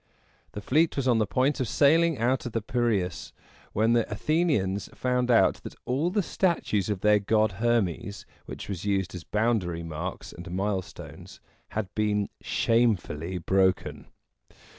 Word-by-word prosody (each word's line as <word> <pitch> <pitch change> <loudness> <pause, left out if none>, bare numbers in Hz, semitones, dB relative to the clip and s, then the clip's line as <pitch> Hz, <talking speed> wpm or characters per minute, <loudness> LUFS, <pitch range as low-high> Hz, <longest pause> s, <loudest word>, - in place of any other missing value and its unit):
The 105 - -6
fleet 155 +9 +2
was 140 -2 -1
on 120 -3 +3
the 105 - +1
point 135 +8 +1
of 130 - -1
sailing 160 +5 +3
out 125 +3 0
of 120 - -8
the 115 - -1
Piræus, 110 -7 -1 0.4
when 110 +3 +2
the 115 -2 +1
Athenians 105 - 0
found 125 -1 0
out 115 -2 +4
that - - -9
all 140 +7 0
the 205 +2 0
statues 165 - 0
of 100 -3 -2
their 105 0 +4
god 105 -1 +1
Her´mes, 105 -4 -1 0.2
which - - -7
were 100 - -3
used 95 0 -2
as 90 -2 -7
boundary 105 -7 0
marks 85 +3 -6
and 85 0 -9
milestones, 95 +1 -5 0.4
had 100 -4 -3
been 105 -1 0
shamefully 95 -7 0
broken. 95 +2 0
110 Hz, 150 wpm, -27 LUFS, 95-125 Hz, 0.4 s, out